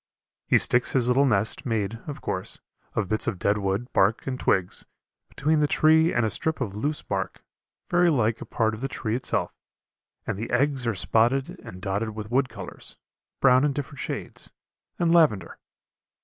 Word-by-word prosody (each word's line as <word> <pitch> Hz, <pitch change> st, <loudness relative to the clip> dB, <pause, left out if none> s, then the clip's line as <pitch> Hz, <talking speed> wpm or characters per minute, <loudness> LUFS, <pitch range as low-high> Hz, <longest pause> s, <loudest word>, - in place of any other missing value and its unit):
He -, -, +5 dB
sticks 125 Hz, +1 st, +3 dB
his 125 Hz, -3 st, +2 dB
little 135 Hz, +3 st, +4 dB
nest, 105 Hz, -2 st, 0 dB
made, 115 Hz, -2 st, -2 dB
of 145 Hz, 0 st, -6 dB
course, 95 Hz, 0 st, -3 dB, 0.4 s
of 105 Hz, -3 st, 0 dB
bits 110 Hz, +3 st, 0 dB
of 100 Hz, -, -1 dB
dead 100 Hz, +3 st, +1 dB
wood, 100 Hz, +5 st, -2 dB
bark, 100 Hz, +4 st, +2 dB
and 130 Hz, -1 st, -3 dB
twigs, 90 Hz, -2 st, +1 dB, 0.5 s
between 155 Hz, +2 st, +1 dB
the 150 Hz, -, +3 dB
tree 160 Hz, +2 st, +4 dB
and 120 Hz, -1 st, +1 dB
a 110 Hz, -, 0 dB
strip 160 Hz, 0 st, -1 dB
of 105 Hz, -7 st, -3 dB
loose 145 Hz, +8 st, -2 dB
bark, 95 Hz, -1 st, -4 dB, 0.4 s
very 175 Hz, 0 st, +3 dB
like 115 Hz, -7 st, +1 dB
a -, -, -5 dB
part 110 Hz, -1 st, 0 dB
of 110 Hz, -, -7 dB
the 135 Hz, -, -1 dB
tree 110 Hz, -4 st, -3 dB
itself, 125 Hz, 0 st, -1 dB, 0.7 s
and 95 Hz, -, -3 dB
the 115 Hz, -, -4 dB
eggs 130 Hz, 0 st, +1 dB
are 115 Hz, -, 0 dB
spotted 120 Hz, +8 st, +1 dB
and 90 Hz, +1 st, -11 dB
dotted 105 Hz, +3 st, -2 dB
with 105 Hz, 0 st, -7 dB
wood 130 Hz, +1 st, +2 dB
colors, 100 Hz, -5 st, -9 dB, 0.4 s
brown 130 Hz, 0 st, +5 dB
in 145 Hz, -1 st, +2 dB
different 145 Hz, 0 st, -6 dB
shades, -, -, -5 dB, 0.5 s
and 170 Hz, -1 st, +2 dB
lavender. 115 Hz, -, +3 dB
120 Hz, 180 wpm, -25 LUFS, 105-140 Hz, 0.7 s, He